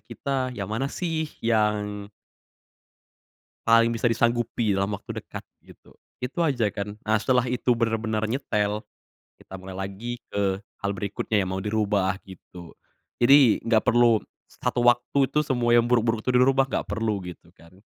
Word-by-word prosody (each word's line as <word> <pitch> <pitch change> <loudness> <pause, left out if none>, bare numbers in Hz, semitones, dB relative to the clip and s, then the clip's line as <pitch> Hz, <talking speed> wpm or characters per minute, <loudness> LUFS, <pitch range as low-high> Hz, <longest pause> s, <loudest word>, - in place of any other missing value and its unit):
kita, 130 +4 -3
yang 100 - -3
mana 135 +5 -1
sih 160 -1 -3 0.2
yang 105 -2 0 1.6
paling 115 0 +5
bisa 115 +1 -3
disanggupi 115 -2 +1
dalam 100 +1 0
waktu 100 - -6
dekat, - - -9 0.2
gitu. - - -19 0.3
Itu 125 +7 -3
aja 125 -8 +1
kan. 105 0 -5
Nah 110 0 +1
setelah 125 +3 +1
itu 125 0 +1
benar-benar 110 -1 -1
nyetel, 105 -4 -1 0.6
kita - - -16
mulai 95 0 -9
lagi 100 +5 -5
ke 100 -1 -1 0.2
hal 100 - 0
berikutnya 100 +2 -1
yang 95 - -3
mau 95 - -3
dirubah 105 -3 0
gitu. 90 -2 -12 0.5
Jadi, 135 -1 +6
nggak 115 -1 +3
perlu 120 -2 +5 0.3
satu 120 - -2
waktu 120 +3 +3
itu 150 - +2
semua 120 -5 +1
yang 120 0 +5
buruk-buruk 115 -2 +2
itu 125 - -1
dirubah, 135 +1 +4
nggak - - -2
perlu 110 0 -1
gitu 90 -1 -10
kan. 90 +4 -20
115 Hz, 150 wpm, -25 LUFS, 100-120 Hz, 1.6 s, Jadi